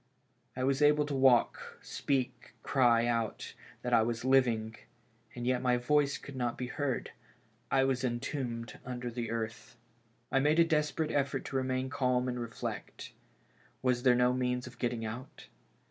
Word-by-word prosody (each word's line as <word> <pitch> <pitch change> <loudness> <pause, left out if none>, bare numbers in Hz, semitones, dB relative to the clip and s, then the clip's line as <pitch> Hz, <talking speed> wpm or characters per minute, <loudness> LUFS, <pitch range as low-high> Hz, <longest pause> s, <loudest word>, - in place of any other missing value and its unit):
I 130 - -2
was 135 +2 +1
able 150 0 +5
to 145 - -4
walk, 130 -3 +3
speak, 130 -3 -2
cry 120 -3 +3
out 115 -2 -2 0.3
that 125 - -1
I 115 - +6
was 115 +1 -2
living, 120 -4 +2 0.6
and 120 0 -5
yet 125 0 +1
my 125 -1 +2
voice 140 +3 +2
could 140 - -10
not 120 -2 -2
be 125 - -3
heard; 130 0 -2 0.6
I 135 -1 +3
was 135 -1 0
entombed 120 -2 -3
under 125 -1 -5
the 115 -1 -4
earth, 115 +1 -5 0.5
I 135 - +3
made 150 +3 +3
a 170 - +7
desperate 155 -1 0
effort 140 -1 -1
to - - -6
remain 130 0 -1
calm 125 -2 +1
and 125 -1 -2
reflect. 115 -1 -6 0.7
Was 125 -1 +2
there 125 -1 +5
no 125 0 +3
means 125 0 -1
of 125 -1 -12
getting 120 -2 -1
out? 115 +4 -7
125 Hz, 160 wpm, -31 LUFS, 120-135 Hz, 0.7 s, a